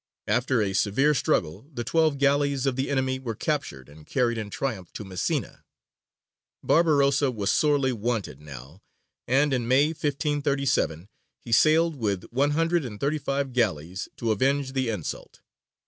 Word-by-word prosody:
After 120 Hz, +2 st, +1 dB
a 95 Hz, -1 st, -2 dB
severe 110 Hz, +10 st, +2 dB
struggle 100 Hz, -, -1 dB
the 120 Hz, -5 st, -4 dB
twelve 155 Hz, +3 st, +2 dB
galleys 140 Hz, -1 st, +2 dB
of 135 Hz, -2 st, +1 dB
the 130 Hz, +1 st, -2 dB
enemy 130 Hz, -1 st, 0 dB
were 120 Hz, -4 st, -5 dB
captured 105 Hz, -, -3 dB
and 75 Hz, +2 st, -15 dB
carried 120 Hz, -3 st, +1 dB
in 110 Hz, -2 st, -5 dB
triumph 105 Hz, -6 st, -4 dB
to -, -, -6 dB
Messina. 95 Hz, -2 st, -3 dB, 1.0 s
Barbarossa 145 Hz, -4 st, +3 dB
was 105 Hz, -5 st, -1 dB
sorely 145 Hz, -4 st, +2 dB
wanted 110 Hz, -, -3 dB
now, 70 Hz, +4 st, -11 dB, 0.5 s
and 135 Hz, +3 st, +3 dB
in 120 Hz, -3 st, -1 dB
May, 135 Hz, +4 st, +4 dB
1537, 140 Hz, -, -1 dB, 0.3 s
he 120 Hz, -, -11 dB
sailed 155 Hz, +6 st, +4 dB
with 100 Hz, -6 st, -1 dB
one 135 Hz, +4 st, +2 dB
hundred 165 Hz, 0 st, +1 dB
and 105 Hz, -5 st, -7 dB
thirty 150 Hz, +2 st, 0 dB
five 140 Hz, -1 st, -2 dB
galleys 90 Hz, -7 st, -1 dB
to 115 Hz, -2 st, -1 dB
avenge 135 Hz, +4 st, 0 dB
the 130 Hz, -3 st, 0 dB
insult. 105 Hz, -8 st, -6 dB
130 Hz, 150 wpm, -26 LUFS, 105-140 Hz, 1.0 s, May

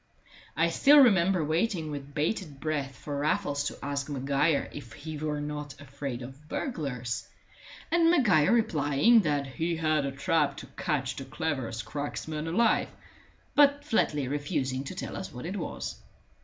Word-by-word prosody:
I 165 Hz, +1 st, +3 dB
still 280 Hz, -, +6 dB
remember 190 Hz, -, +5 dB
waiting 165 Hz, 0 st, 0 dB
with 140 Hz, -1 st, -7 dB
bated 150 Hz, -2 st, -2 dB
breath 145 Hz, -3 st, -2 dB
for 145 Hz, +2 st, -5 dB
Raffles 145 Hz, -2 st, 0 dB
to -, -, -3 dB
ask 140 Hz, 0 st, -2 dB
Maguire 140 Hz, +2 st, +1 dB
if 120 Hz, -6 st, -9 dB
he 155 Hz, +2 st, -7 dB
were 150 Hz, 0 st, -2 dB
not 145 Hz, -1 st, -5 dB
afraid 140 Hz, -3 st, -6 dB
of 135 Hz, +5 st, -12 dB
burglars, 125 Hz, -, -3 dB, 0.6 s
and 335 Hz, 0 st, +4 dB
Maguire 200 Hz, -, +4 dB
replying 220 Hz, -1 st, +4 dB
that 145 Hz, -7 st, +1 dB
he 160 Hz, +6 st, -2 dB
had 155 Hz, -2 st, +1 dB
a -, -, -2 dB
trap 140 Hz, +2 st, +1 dB
to -, -, -7 dB
catch 140 Hz, -6 st, -1 dB
the 135 Hz, -, -5 dB
cleverest 130 Hz, -9 st, -3 dB
cracksman 150 Hz, +4 st, -4 dB
alive, 225 Hz, +8 st, +3 dB, 0.7 s
but 285 Hz, 0 st, +4 dB
flatly 150 Hz, -, +1 dB
refusing 140 Hz, -2 st, -2 dB
to 185 Hz, -, -6 dB
tell -, -, -5 dB
us 190 Hz, -, -6 dB
what 125 Hz, +1 st, -8 dB
it 185 Hz, +4 st, -4 dB
was. -, -, -5 dB
150 Hz, 155 wpm, -29 LUFS, 140-170 Hz, 0.7 s, still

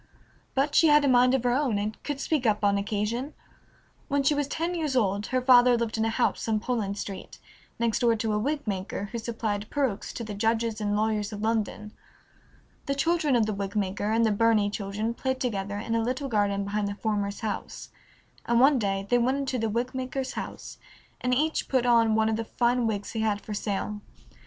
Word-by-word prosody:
But 280 Hz, +2 st, +1 dB
she 325 Hz, -, +6 dB
had 295 Hz, -1 st, +5 dB
a -, -, +3 dB
mind 250 Hz, 0 st, +5 dB
of 260 Hz, -, -1 dB
her 245 Hz, -, +2 dB
own 260 Hz, -5 st, +1 dB
and 210 Hz, +1 st, -3 dB
could 290 Hz, -2 st, -4 dB
speak 280 Hz, -4 st, 0 dB
up 210 Hz, -1 st, +1 dB
on 200 Hz, 0 st, +4 dB
occasion. 215 Hz, +7 st, -2 dB, 0.7 s
When 280 Hz, 0 st, +1 dB
she 275 Hz, -, +3 dB
was 290 Hz, -1 st, -1 dB
ten 330 Hz, +4 st, -2 dB
years 310 Hz, -6 st, -2 dB
old 205 Hz, -3 st, +1 dB
her 255 Hz, -1 st, 0 dB
father 250 Hz, -1 st, +6 dB
lived 230 Hz, -1 st, -2 dB
in 220 Hz, 0 st, 0 dB
a -, -, +1 dB
house 235 Hz, +1 st, 0 dB
on 220 Hz, -1 st, +1 dB
Poland 215 Hz, -4 st, -2 dB
Street, 195 Hz, -2 st, -7 dB, 0.4 s
next 230 Hz, -1 st, 0 dB
door 235 Hz, -2 st, +3 dB
to 220 Hz, -1 st, -1 dB
a 210 Hz, -, +1 dB
wig 290 Hz, +6 st, -2 dB
maker, 200 Hz, 0 st, -3 dB
who 235 Hz, -, -3 dB
supplied 220 Hz, -2 st, -3 dB
perukes 265 Hz, -9 st, -1 dB
to 235 Hz, -, -5 dB
the 215 Hz, -2 st, -6 dB
judges 225 Hz, +1 st, 0 dB
and 205 Hz, 0 st, 0 dB
lawyers 215 Hz, 0 st, 0 dB
of 210 Hz, 0 st, -6 dB
London. 215 Hz, -1 st, -1 dB, 1.0 s
The 275 Hz, -, 0 dB
children 315 Hz, -1 st, +1 dB
of 230 Hz, -3 st, +3 dB
the 215 Hz, -, -2 dB
wig 200 Hz, +1 st, -4 dB
maker 205 Hz, 0 st, -1 dB
and 230 Hz, +1 st, +3 dB
the 220 Hz, -, +2 dB
Burney 210 Hz, -1 st, +3 dB
children 210 Hz, +3 st, -3 dB
played 260 Hz, +2 st, -2 dB
together 205 Hz, -6 st, -2 dB
in 225 Hz, +2 st, -3 dB
a 230 Hz, -, +2 dB
little 255 Hz, +4 st, -2 dB
garden 205 Hz, -3 st, +1 dB
behind 205 Hz, +1 st, -1 dB
the 200 Hz, -, -4 dB
former's 205 Hz, -1 st, -2 dB
house, 215 Hz, -2 st, -5 dB, 0.6 s
and 235 Hz, 0 st, +3 dB
one 270 Hz, +1 st, +5 dB
day 195 Hz, -2 st, -1 dB
they 245 Hz, +2 st, +3 dB
went 255 Hz, +3 st, +1 dB
into 270 Hz, -2 st, -2 dB
the 225 Hz, 0 st, 0 dB
wig 235 Hz, +4 st, -2 dB
maker's 260 Hz, 0 st, -3 dB
house, -, -, -7 dB, 0.4 s
and 250 Hz, -, 0 dB
each 305 Hz, +5 st, +1 dB
put 260 Hz, -2 st, +2 dB
on 230 Hz, -2 st, +4 dB
one 220 Hz, 0 st, +3 dB
of 220 Hz, 0 st, 0 dB
the 225 Hz, -, -3 dB
fine 240 Hz, +1 st, +1 dB
wigs 205 Hz, -2 st, -3 dB
he 225 Hz, -, -4 dB
had 215 Hz, -2 st, +1 dB
for 210 Hz, -, -7 dB
sale. 205 Hz, 0 st, -3 dB
225 Hz, 215 wpm, -27 LUFS, 210-255 Hz, 1.0 s, she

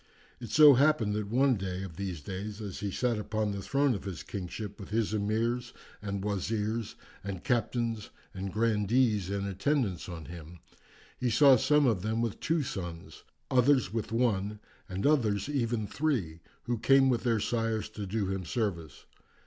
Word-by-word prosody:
It 120 Hz, -, -8 dB
so 150 Hz, +4 st, +8 dB
happened 135 Hz, -5 st, +3 dB
that 105 Hz, -1 st, -2 dB
one 130 Hz, +1 st, +3 dB
day 95 Hz, -1 st, -4 dB
of 90 Hz, -4 st, -8 dB
the 100 Hz, +1 st, -3 dB
days 100 Hz, +7 st, -6 dB
as 100 Hz, -4 st, -6 dB
he 100 Hz, -, -2 dB
sat 120 Hz, +2 st, 0 dB
upon 105 Hz, 0 st, -1 dB
the 100 Hz, -1 st, -4 dB
throne 140 Hz, +4 st, +2 dB
of 100 Hz, -3 st, -5 dB
his 90 Hz, -5 st, -5 dB
kingship 100 Hz, +2 st, -6 dB
with 100 Hz, -, -9 dB
his 110 Hz, 0 st, 0 dB
Emirs 110 Hz, +4 st, -1 dB, 0.3 s
and 100 Hz, -2 st, -4 dB
Wazirs, 105 Hz, +2 st, -2 dB, 0.3 s
and 95 Hz, -3 st, -5 dB
Captains 115 Hz, -3 st, -1 dB, 0.2 s
and 95 Hz, 0 st, -5 dB
Grandees 110 Hz, -1 st, +2 dB
in 100 Hz, 0 st, -2 dB
attendance 100 Hz, -, -1 dB
on 85 Hz, -3 st, -7 dB
him, 85 Hz, 0 st, -10 dB, 0.6 s
he 125 Hz, -, +1 dB
saw 135 Hz, +3 st, +7 dB
some 145 Hz, +3 st, +3 dB
of 110 Hz, -7 st, +2 dB
them 110 Hz, +3 st, -1 dB
with 115 Hz, -3 st, -2 dB
two 160 Hz, -2 st, 0 dB
sons, 85 Hz, -, -6 dB, 0.3 s
others 130 Hz, -4 st, +3 dB
with 110 Hz, -2 st, -3 dB
one, 105 Hz, -3 st, 0 dB, 0.3 s
and 95 Hz, +1 st, -3 dB
others 115 Hz, -9 st, +2 dB
even 120 Hz, -6 st, -1 dB
three, 105 Hz, -, -1 dB, 0.2 s
who 120 Hz, -2 st, -2 dB
came 135 Hz, +2 st, +5 dB
with 120 Hz, -3 st, +2 dB
their 115 Hz, -3 st, +1 dB
sires 115 Hz, 0 st, -1 dB
to 105 Hz, -2 st, -6 dB
do 105 Hz, +1 st, -1 dB
him 95 Hz, 0 st, -2 dB
service. 85 Hz, -, -3 dB
105 Hz, 170 wpm, -30 LUFS, 95-120 Hz, 0.6 s, so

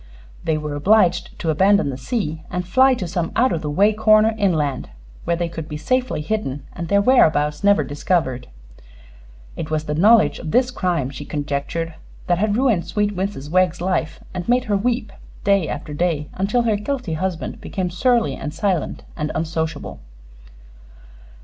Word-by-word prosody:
They 160 Hz, -1 st, 0 dB
were 150 Hz, -1 st, -4 dB
obliged 180 Hz, +3 st, +2 dB
to 165 Hz, -, -1 dB
abandon 190 Hz, -1 st, +3 dB
the -, -, -5 dB
sea 155 Hz, -, -3 dB
and 180 Hz, 0 st, -3 dB
fly 260 Hz, +7 st, +5 dB
to 185 Hz, -7 st, -4 dB
some 170 Hz, -1 st, -2 dB
out 255 Hz, +3 st, +3 dB
of 160 Hz, -, -2 dB
the 150 Hz, -, -3 dB
way 200 Hz, +8 st, +3 dB
corner 215 Hz, +1 st, +4 dB
inland, 160 Hz, -10 st, 0 dB, 0.4 s
where 170 Hz, -, +1 dB
they 170 Hz, 0 st, -1 dB
could 165 Hz, -2 st, -7 dB
be 150 Hz, -, -4 dB
safely 255 Hz, +3 st, -1 dB
hidden 150 Hz, -7 st, -3 dB
and 170 Hz, -2 st, -5 dB
their 200 Hz, +2 st, +3 dB
whereabouts 150 Hz, -, +3 dB
never 200 Hz, 0 st, +4 dB
discovered. 145 Hz, -4 st, -1 dB, 1.1 s
It 155 Hz, -, -5 dB
was 155 Hz, -1 st, -1 dB
the 150 Hz, -, -3 dB
knowledge 215 Hz, +8 st, +4 dB
of 160 Hz, -, -6 dB
this 250 Hz, +8 st, +2 dB
crime, 175 Hz, -, -1 dB
she 145 Hz, -, -7 dB
conjectured, 145 Hz, +3 st, -3 dB, 0.3 s
that 175 Hz, -1 st, +1 dB
had 210 Hz, +1 st, +1 dB
ruined 225 Hz, -10 st, +2 dB
sweet 205 Hz, +3 st, -1 dB
Mrs. 185 Hz, -6 st, -4 dB
Wegg's 185 Hz, -1 st, +2 dB
life 165 Hz, -3 st, -1 dB
and 180 Hz, +1 st, -5 dB
made 245 Hz, +1 st, +3 dB
her 210 Hz, -5 st, 0 dB
weep 230 Hz, +1 st, -1 dB, 0.3 s
day 200 Hz, -5 st, +3 dB
after 150 Hz, -, -5 dB
day 150 Hz, -2 st, -1 dB
until 210 Hz, +6 st, 0 dB
her 220 Hz, -3 st, +1 dB
guilty 250 Hz, -, -3 dB
husband 175 Hz, +1 st, -3 dB
became 185 Hz, -2 st, -3 dB
surly 240 Hz, +4 st, +2 dB
and 150 Hz, 0 st, -6 dB
silent 190 Hz, -7 st, -1 dB
and 150 Hz, -1 st, -3 dB
unsociable. 160 Hz, -1 st, -3 dB
180 Hz, 170 wpm, -21 LUFS, 155-210 Hz, 1.1 s, fly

